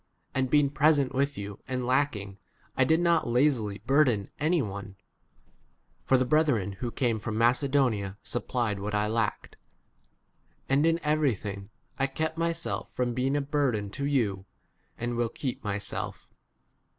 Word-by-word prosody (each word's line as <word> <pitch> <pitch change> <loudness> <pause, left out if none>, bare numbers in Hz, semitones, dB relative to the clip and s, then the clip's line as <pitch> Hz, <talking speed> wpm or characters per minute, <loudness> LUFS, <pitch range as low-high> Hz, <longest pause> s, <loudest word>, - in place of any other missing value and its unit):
And 130 -1 0
being 145 0 +4
present 145 -2 +3
with 140 +2 0
you 100 0 -6
and 130 -1 -2
lack 130 +1 +2
ing, 100 -1 -7 0.4
I 130 - +4
did 160 +5 +3
not 170 -5 +2
lazily 120 -5 +1
burden 125 -7 +3
any 165 +4 +2
one, 100 -5 -5 1.1
(for 130 - +4
the 130 - +1
brethren 145 -9 +2
who 120 - -2
came 120 -2 0
from 110 0 -4
Macedonia 120 -5 +2
supplied 120 -4 -1
what 105 +1 -3
I 105 0 +2
lacked,) 110 0 -2 1.1
and 140 +4 +3
in 165 0 +2
everything 115 -10 0 0.3
I 135 - +3
kept 160 +4 -2
myself 165 0 -2
from 125 -1 0
being 130 +3 0
a - - +1
burden 135 -8 0
to 135 - -9
10 - - 0
you, 100 -9 0 0.5
and 120 0 -3
will 120 -1 +1
keep 130 0 -4
myself. 100 -1 -4
125 Hz, 150 wpm, -28 LUFS, 105-145 Hz, 1.1 s, being